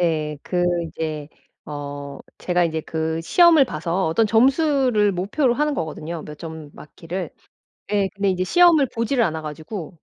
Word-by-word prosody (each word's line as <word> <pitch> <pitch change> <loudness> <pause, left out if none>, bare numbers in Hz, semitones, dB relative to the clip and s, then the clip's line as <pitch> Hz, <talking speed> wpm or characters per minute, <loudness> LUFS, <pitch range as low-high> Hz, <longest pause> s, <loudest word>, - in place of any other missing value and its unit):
예 155 -3 0
그 180 -1 -1 0.2
이제 155 -2 -5 0.4
어 145 -1 -7 0.2
제가 180 -1 +1
이제 160 -1 -1
그 160 +1 -3
시험을 325 - +5
봐서 170 -3 -2
어떤 215 +8 +2
점수를 255 -2 +3
목표로 210 +8 0
하는 300 +2 0
거거든요 160 - -5
몇 150 -1 -10
점 160 -2 -8
맞기를. 170 +2 -7 0.6
예 200 -2 +2
근데 200 -1 0
이제 185 0 -1
시험을 335 - +5
보지를 235 +2 +1
않아 160 -4 -2
가지고. 160 +3 -7
175 Hz, 300 characters per minute, -22 LUFS, 155-230 Hz, 0.6 s, 시험을